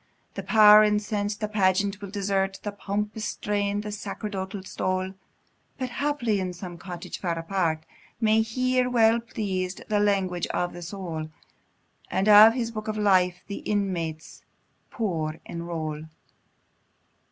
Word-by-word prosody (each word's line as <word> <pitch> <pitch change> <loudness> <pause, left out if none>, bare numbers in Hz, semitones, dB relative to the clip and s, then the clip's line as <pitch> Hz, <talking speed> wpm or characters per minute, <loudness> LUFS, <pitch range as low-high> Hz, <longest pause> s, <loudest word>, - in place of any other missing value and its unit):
The - - -4
Power, 215 -1 +8
incens'd, 210 0 0
the 215 - 0
pageant 200 0 +1
will 200 - -6
desert, 195 -1 -1
The 205 - -3
pompous 210 +2 -3
strain, 205 -1 -1
the 210 0 -6
sacerdotal 200 -2 -5
stole; 185 0 -2 0.6
But 255 -1 -3
haply, 250 -7 0
in 185 -1 -3
some 175 -1 -8
cottage 175 -1 -7
far 170 -3 -2
apart, 165 -2 -1 0.3
May 220 -1 +4
hear, 255 +3 +1
well 230 -1 +4
pleas'd, 195 -5 -4
the 210 -1 +2
language 195 -4 +1
of 175 0 -2
the 175 - -8
soul; 170 -3 -5 0.8
And 195 - 0
in 215 +1 +10
His 230 -2 -2
Book 215 -1 -6
of 215 0 -2
Life 185 -3 +2
the 200 - -6
inmates 175 -6 -3 0.5
poor 160 -8 -2
enroll. 160 -2 -5
200 Hz, 135 wpm, -26 LUFS, 180-215 Hz, 0.8 s, in